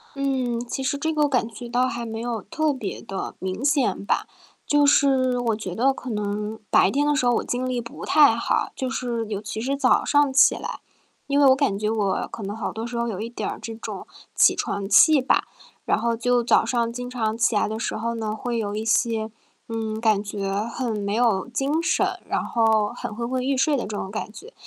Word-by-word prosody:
嗯， 260 -4 -1
其 265 - -3
实 275 +2 0
这 320 +3 -1
个 300 -2 +2
感 250 -4 +1
觉 235 +1 -9
到 250 +2 +2
还 240 -2 -4
没 225 0 -5
有 235 -2 -3
特 310 +7 -1
别 225 -7 -5
地 195 - -5
明 190 +5 -4
显 280 -8 +1
吧。 - - 0 0.4
就 290 0 +4
是 265 -3 +3
我 230 -2 0
觉 195 -5 -6
得 265 +5 +3
可 255 - -8
能 210 0 -3
白 - - +5
天 290 +2 +1
的 295 - +3
时 255 - +1
候 245 - +4
我 - - 0
精 255 +1 -2
力 250 -1 -1
不 235 - -8
太 290 -6 +6
好， 230 - 0
就 260 - -3
是 240 -3 -2
尤 205 -2 -4
其 215 +1 -5
是 270 +4 -1
早 260 -2 +3
上 290 -2 +3
起 270 - +6
来， - - -6 0.5
因 285 0 +2
为 285 - +6
我 260 - +7
感 265 -8 0
觉 215 - 0
我 210 -3 0
可 220 - -7
能 200 +2 -4
好 225 - -4
多 225 +1 -4
时 240 0 -5
候 235 0 0
有 210 -3 -4
一 230 - -4
点 240 - -4
儿 - - -5
这 225 - -6
种 225 - -7 0.3
起 - - +6
床 195 -1 -3
气 290 +8 +6
吧， 255 - +2 0.4
然 - - +2
后 230 +1 0
就 245 +1 +1
早 - - +3
上 235 -2 0
经 245 +1 -6
常 225 -3 -2
起 230 -1 +2
来 - - +2
的 220 +1 -4
时 - - -2
候 230 +2 -2
呢， 215 -1 -3
会 235 +2 -3
有 205 -2 -2
一 215 +1 -3
些 225 -1 +1 0.4
嗯， 220 -1 -3
感 215 -3 +2
觉 200 -1 -4 0.2
很 235 -3 -3
没 200 0 -2
有 225 -4 +2
精 285 +6 -1
神， - - +1
然 - - 0
后 220 -2 +2
很 - - -5
昏 235 +2 -4
昏 255 0 -1
欲 270 0 +1
睡 290 +3 +2
的 255 - -1
这 205 0 -5
种 190 - -4
感 210 +1 -5
觉， 435 - -13
235 Hz, 250 characters per minute, -24 LUFS, 220-260 Hz, 0.5 s, 我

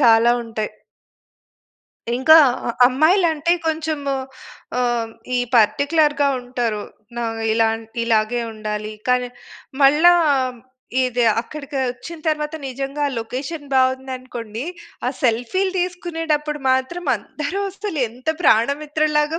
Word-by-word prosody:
చాలా 235 -2 +6
ఉంటాయి. 220 -2 -4 1.5
ఇంకా 315 +5 +7 0.3
అ - - +2 0.2
అమ్మాయిలంటే 320 +3 +3
కొంచెం 315 -1 -1 0.8
ఆహ్, 240 -2 0 0.3
ఈ - - +2 0.2
పార్టిక్యులర్‌గా 285 +5 +3
ఉంటారు. 245 -4 -2 0.3
న - - -3 0.3
ఇలా 225 0 +3 0.4
ఇలాగే 225 +1 +1
ఉండాలి. 215 0 -4 0.2
కానీ, 250 0 +2 0.5
మళ్ళా 300 +6 +7 0.9
ఇది 250 -1 0 0.2
అక్కడికి 280 +3 -8
వచ్చిన 280 +7 -9
తర్వాత 300 0 -1
నిజంగా 275 +3 -4
ఆ 275 - -6
లొకేషన్ 270 +7 -5
బాగుందనుకోండి. 255 -3 -1 0.4
ఆ - - +3
సెల్ఫీలు 250 +12 +1
తీసుకునేటప్పుడు 325 -4 -2
మాత్రం 260 +7 0
అందరూ 300 - -5
అసలు 395 -4 -5
ఎంత 250 +6 -10
ప్రాణమిత్రులాగా 300 +5 +2
270 Hz, 100 wpm, -21 LUFS, 240-310 Hz, 1.5 s, ఇంకా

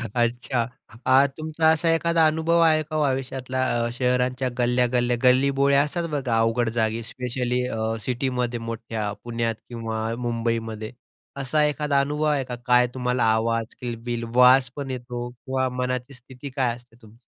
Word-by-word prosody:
अच्छा. 120 0 0 0.4
आ 130 +2 +6
तुमचा 160 0 +1
असा 160 +1 +3
एखादा 165 0 +3
अनुभव 160 +2 +2
आहे 160 -1 +4
का 155 +1 -7
हो 155 - +1
आयुष्यातला 130 -1 -2 0.2
अ, - - -1
शहरांच्या 125 +1 0
गल्ल्या-गल्ल्या 125 0 +1
गल्लीबोळ्या 140 +2 +4
असतात 170 +3 -3
बघा. 135 -6 -1
अवघड 115 +1 +1
जागी 110 +1 0
स्पेशली 125 +1 -2
अ, 115 - -4 0.2
सिटीमध्ये 125 0 -1
मोठ्या, 115 -2 -4
पुण्यात 115 -1 -2
किंवा 115 -2 -4 0.2
मुंबईमध्ये. 115 -2 -2 0.5
असा 140 +3 +1
एखादा 150 -1 +1
अनुभव 150 +2 -2
आहे 140 -2 +1
का 125 - -5
काय 125 0 +5
तुम्हाला 125 -1 0
आवाज, 115 +1 0 0.2
किलबिल, 120 -1 -4
वास 125 +1 +6
पण 140 -2 -5
येतो 120 -1 -5
किंवा 130 +2 -2
मनाची 125 +1 -3
स्थिती 130 +2 -10
काय 130 -3 0
असते 120 -1 -19
तुमची? 110 0 -17
125 Hz, 150 wpm, -24 LUFS, 120-140 Hz, 0.5 s, आ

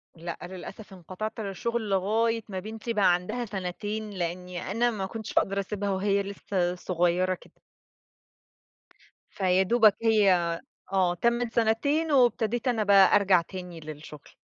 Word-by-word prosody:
لأ 170 0 -6
للأسف 195 +3 -9
انقطعت 190 +5 -6
عن 205 - -3
الشغل 225 +3 -3
لغاية 225 +4 +1
ما 190 -2 -4
بنتي 220 +4 -5
بقى 200 -4 +4
عندها 180 +8 -2
سنتين، 205 +2 -4
لإنّي 180 -1 -4
أنا 240 +3 +2
ما 200 -4 -3
كنتش 220 +2 -7
هاقدر 195 +1 -1
أسيبها 200 0 -3
وهي 200 +1 +1
لسّه 190 -2 -2
صغيّرة 180 +1 0
كده. 180 - -14 1.7
فيا 185 -1 +2
دوبك 215 0 +5
هي 215 -3 +4 0.6
آه 185 -2 +3
تمّت 235 +4 0
سنتين 285 +8 +1
وابتديت 240 -2 +2
أنا 230 -3 +1
بقى 200 -1 +6
أرجع 195 -3 +4
تاني 180 -1 -8
للشغل. 150 -1 -10
200 Hz, 135 wpm, -27 LUFS, 180-220 Hz, 1.7 s, بقى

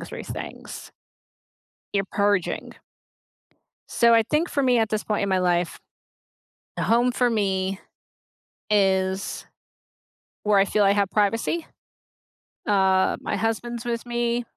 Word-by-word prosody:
through - - -8
things - - -8 1.0
you're 195 -1 +1
purging. 200 -3 0 1.2
So, 235 0 +4
I 230 -1 +6
think 300 +9 0
for 280 - 0
me 250 -2 +3
at 220 -2 +1
this 215 -1 -1
point 210 -1 -1
in 200 - -1
my 190 - +2
life, 175 -1 0 1.0
the - - -1
home 240 +2 +3
for 245 0 +1
me 195 -4 -1 0.9
is 190 -1 +1 1.0
where 210 -1 +3
I 195 - +6
feel 205 +1 +1
I 195 - +5
have 200 -2 +1
privacy. 230 +10 0 1.0
Uh, 190 -2 +3
my - - -2
husband's 235 +1 -3
with 235 -1 -3
me, 240 0 -1
210 Hz, 130 wpm, -24 LUFS, 195-235 Hz, 1.2 s, I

